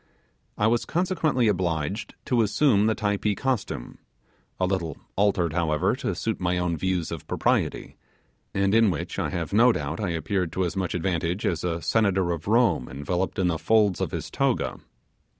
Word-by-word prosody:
I 105 - +2
was 115 +1 +2
consequently 165 -8 +1
obliged 90 0 -1
to 120 -2 +2
assume 110 -1 +3
the 110 - +2
Typee 105 -1 0
costume, 125 - -3 0.6
a 95 - +2
little 90 -5 -2 0.2
altered, 95 -5 +2
however, 80 -3 +1
to - - -2
suit - - -2
my 90 0 0
own 90 -1 0
views 90 +1 -1
of 85 -3 -6
propriety, - - -1 0.5
and 100 0 +1
in 115 -1 +5
which 85 -6 -3
I - - -1
have 85 -1 -4
no 120 +4 +6
doubt 75 -5 -3
I 100 -4 -1
appeared 85 +1 -1
to 95 - 0
as 85 - -3
much 95 -2 -2
advantage 90 +1 -1
as 85 -3 0
a 85 -2 -2
senator 95 -1 +2
of 85 0 -4
Rome 115 - +2
enveloped 85 +7 -2
in 95 - +1
the 85 -3 0
folds 105 -4 +3
of - - 0
his - - -5
toga. - - 0
95 Hz, 175 wpm, -25 LUFS, 85-105 Hz, 0.6 s, no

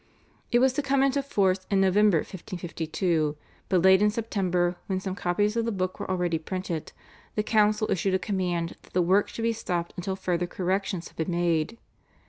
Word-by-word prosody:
It 240 - +5
was 255 +1 +4
to 295 - 0
come 275 -1 +2
into 275 +1 +2
force 190 -8 +1
in 195 - +2
November 195 0 +4
1552, 165 -3 -2 0.3
but 185 -3 +3
late 190 +1 +6
in 210 - +5
September, 185 -5 0
when 190 -1 -1
some 190 0 -4
copies 205 +4 0
of 230 - +1
the 230 - 0
Book 185 -2 -2
were - - -5
already 175 -3 0
printed, 175 -1 -4 0.4
the 210 - +1
council 215 0 +3
issued 190 +1 +1
a - - +4
command 180 -3 -2
that - - -21
the 180 - +3
work 190 +4 +3
should 225 - -5
be 230 0 +2
stopped 175 -6 -3
until 190 +1 -3
further 175 -2 -1
corrections 185 0 -2
had - - -26
been 160 +2 -2
made. 170 +3 0
190 Hz, 190 wpm, -27 LUFS, 175-210 Hz, 0.4 s, late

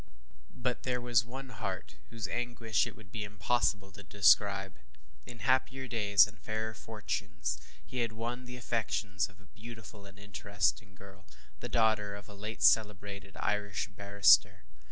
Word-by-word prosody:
But 125 0 -2
there 125 -1 -1
was 120 -2 +3
one 130 +3 -8
heart 100 -4 -5
whose 115 -4 -4
anguish 120 -2 0
it - - -9
would 105 -3 -16
be 110 -2 -3
impossible 105 -1 0
to 100 - -11
describe. 100 -3 +3 0.5
In 115 -3 -8
happier 130 0 +1
days 100 -5 +5
and 105 -1 -12
fairer 110 +1 -3
fortunes, 105 -3 -4 0.3
he 130 - -5
had 115 -2 0
won 120 +3 -4
the 125 0 -8
affections 110 -5 -1
of 100 0 -20
a 100 - -19
beautiful 110 0 -11
and 100 +1 -15
interesting 100 -4 -2
girl, 95 0 -15 0.3
the - - -6
daughter 110 -3 +2
of 100 -2 -10
a 105 - -11
late 105 +3 -5
celebrated 100 -2 +2
Irish 105 -1 -1
barrister. 100 -9 +4
105 Hz, 155 wpm, -32 LUFS, 100-115 Hz, 0.5 s, days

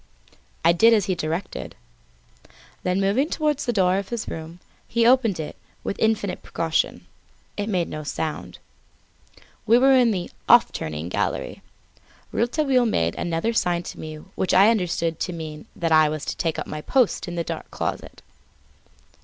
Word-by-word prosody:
I 170 - +7
did 225 +6 +6
as 205 -4 +1
he 190 - 0
directed. 165 +2 -4 1.1
Then 180 +1 0
moving 210 +10 +1
towards 300 -2 0
the - - +3
door 190 -3 +2
of 200 - -7
his 235 -2 -4
room, 165 +2 -7 0.3
he 230 0 +1
opened 235 -7 +4
it 155 - -5 0.3
with 200 - -4
infinite 215 -4 0
precaution; 165 -1 -1 0.5
it 205 +1 -3
made 180 -5 0
no 155 0 -6
sound. 155 +2 -4 1.1
We 230 - +6
were 265 +2 +5
in 250 -3 +5
the 185 -5 -2 0.2
"off - - +7
turning" 80 +1 -4
gallery. 90 - -2 0.7
Rouletabille 255 0 +2
made 85 - +1
another 175 +6 -1
sign 175 -5 +1
to - - -8
me 155 0 -6 0.2
which 190 - 0
I 200 +4 +7
understood 170 -6 -1
to 180 - -2
mean 155 -2 -7
that 165 -1 -1
I 155 -1 +6
was 155 -1 -4
to - - -3
take 165 -3 -1
up - - -3
my 155 - -6
post 250 - +1
in 175 - -5
the 170 - -1
dark - - -6
closet. - - -5
180 Hz, 165 wpm, -24 LUFS, 165-230 Hz, 1.1 s, I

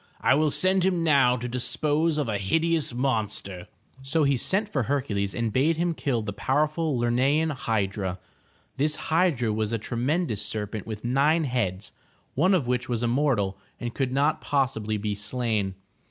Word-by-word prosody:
I - - +3
will 155 +2 +3
send 185 +4 +3
him 180 -3 +1
now 135 -6 +4
to 120 +1 -4
dispose 150 +6 0
of 145 -4 0
a 105 -2 -1
hideous 160 +10 +1
monster.'' 110 -7 -2 0.3
So 145 +4 +1
he 140 -1 +3
sent 190 - 0
for 145 -10 -1
Hercules 105 -9 -1
and 115 -3 -1
bade 155 +5 +2
him 170 0 0
kill 125 -7 -1
the 100 -1 -4
powerful 150 +5 0
Ler'ne 120 0 +1 0.2
an 160 0 +1
hydra. 100 -7 -2 0.6
This 150 +3 +1
hydra 155 -10 +1
was 110 0 -1
a - - +1
tremendous 120 - -1
serpent 105 0 -4
with 110 0 -6
nine 145 +6 +3
heads, 105 -8 -2 0.4
one 185 +7 +3
of 160 -8 0
which 125 0 -1
was 120 -1 -1
immortal 120 -6 +1 0.2
and 120 -1 -4
could 135 -2 -1
not 140 +4 +1
possibly 110 -7 0
be 105 0 -2
slain. 105 -2 -2
125 Hz, 170 wpm, -26 LUFS, 110-150 Hz, 0.6 s, now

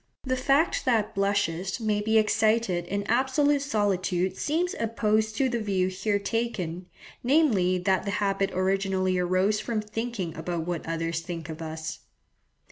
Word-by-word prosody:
The 260 -1 0
fact 275 +5 +2
that 225 -4 +1
blushes 195 -2 0
may 215 -2 0
be 220 +1 +2
excited 215 -4 +2
in 200 +2 -2
absolute 265 +6 +2
solitude 190 -6 0
seems 335 - 0
opposed 220 -1 +1
to 270 - +3
the 240 -2 -1
view 190 -4 0
here 200 +2 0
taken, 200 -5 -3 0.4
namely 240 - +3
that 190 +1 +1
the - - -2
habit 195 -1 +1
originally 185 0 +1
arose 185 +4 +2
from 230 -1 -2
thinking 210 -4 -4
about 165 0 -3
what 175 -2 -4
others 165 0 -1
think 165 -1 -6
of 160 0 -7
us. 160 0 -5
200 Hz, 145 wpm, -27 LUFS, 180-225 Hz, 0.4 s, to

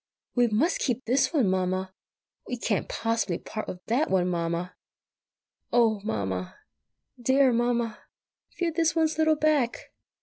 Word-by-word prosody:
"We 245 -1 +3
must 240 - +1
keep 250 -1 -1
this 260 +4 +2
one, 280 - +2
Mamma!" 185 0 -1 0.5
"We 245 - -3
can't 220 -4 -1
possibly 225 -6 -1
part 215 - -6
with 180 - -8
that 255 +8 +1
one, 185 -2 +2
Mamma!" 170 +1 -2 1.0
"Oh, 225 -4 +3
Mamma!" 95 - -3 0.6
"Dear 260 +1 +4
Mamma!" 235 -2 0 0.5
"Feel 345 -2 -2
this 325 -2 +2
one's 320 -1 +1
little 315 0 +4
back!" 300 -5 0
230 Hz, 135 wpm, -27 LUFS, 185-275 Hz, 1.0 s, Dear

